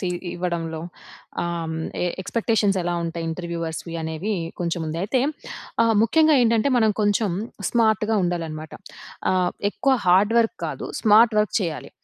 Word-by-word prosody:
తి 185 Hz, -, -2 dB, 0.2 s
ఇవ్వడంలో, 170 Hz, -2 st, -3 dB, 0.6 s
ఆహ్, 170 Hz, 0 st, -2 dB, 0.2 s
హ్మ్, 160 Hz, -, -3 dB, 0.5 s
ఎక్స్‌పెక్టేషన్స్ 215 Hz, -2 st, +1 dB
ఎలా 175 Hz, 0 st, -1 dB
ఉంటాయి 165 Hz, 0 st, -4 dB
ఇంటర్‌వ్యూవర్స్‌వి 165 Hz, 0 st, -4 dB
అనేవి 160 Hz, +6 st, -3 dB, 0.3 s
కొంచెం 170 Hz, 0 st, -1 dB
ఉంది. 155 Hz, +2 st, -3 dB
అయితే 245 Hz, +5 st, +1 dB, 0.6 s
ఆహ్, 230 Hz, -1 st, +3 dB
ముఖ్యంగా 310 Hz, +5 st, +4 dB
ఏంటంటే 230 Hz, +1 st, +3 dB
మనం 220 Hz, -2 st, +4 dB
కొంచెం 205 Hz, -1 st, +2 dB, 0.4 s
స్మార్ట్‌గా 220 Hz, -2 st, +2 dB
ఉండాలనమాట. 165 Hz, -3 st, -3 dB, 0.6 s
ఆహ్, 185 Hz, -1 st, +1 dB, 0.2 s
ఎక్కువ 270 Hz, +4 st, +1 dB
హార్డ్ 195 Hz, +5 st, +4 dB
వర్క్ 230 Hz, +10 st, +1 dB
కాదు. -, -, -5 dB
స్మార్ట్ 220 Hz, +1 st, +5 dB
వర్క్ 210 Hz, -, +1 dB
చేయాలి. 165 Hz, -5 st, -4 dB
185 Hz, 135 wpm, -23 LUFS, 170-225 Hz, 0.6 s, స్మార్ట్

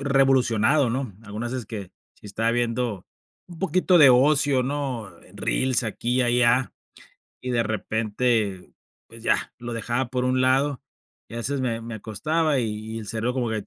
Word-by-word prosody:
revolucionado, 135 Hz, -2 st, +3 dB
¿no? 125 Hz, -5 st, -3 dB
Algunas 110 Hz, +3 st, -5 dB
veces 130 Hz, -3 st, -4 dB
que 100 Hz, -5 st, -7 dB, 0.2 s
si -, -, -15 dB
estaba 115 Hz, +3 st, -1 dB
viendo 120 Hz, -4 st, -1 dB, 0.4 s
un 175 Hz, -2 st, -12 dB
poquito 185 Hz, -1 st, +2 dB
de 145 Hz, -5 st, +8 dB
ocio, 135 Hz, +1 st, +4 dB
¿no? 130 Hz, -5 st, -3 dB
Eh, -, -, -19 dB
reels 130 Hz, -2 st, 0 dB
aquí 120 Hz, +2 st, -2 dB
y -, -, +4 dB
allá, 125 Hz, +1 st, +2 dB, 0.7 s
y 125 Hz, -, -3 dB
de 120 Hz, -2 st, +2 dB
repente, 110 Hz, -2 st, -1 dB, 0.3 s
pues 115 Hz, 0 st, -14 dB
ya, -, -, 0 dB
lo 120 Hz, -1 st, -6 dB
dejaba 120 Hz, +2 st, -2 dB
por 125 Hz, 0 st, -2 dB
un 130 Hz, 0 st, +1 dB
lado, 135 Hz, +2 st, +2 dB, 0.5 s
y -, -, -10 dB
a -, -, -5 dB
veces 135 Hz, +4 st, -2 dB
me 115 Hz, -3 st, -2 dB
me 115 Hz, 0 st, -7 dB
acostaba, 150 Hz, +8 st, 0 dB
y 115 Hz, -, -1 dB, 0.3 s
y -, -, -3 dB
el 110 Hz, -, -8 dB
cerebro 115 Hz, +4 st, -2 dB
como 125 Hz, -3 st, -1 dB
que, 110 Hz, -2 st, -2 dB
120 Hz, 175 wpm, -24 LUFS, 115-130 Hz, 0.7 s, de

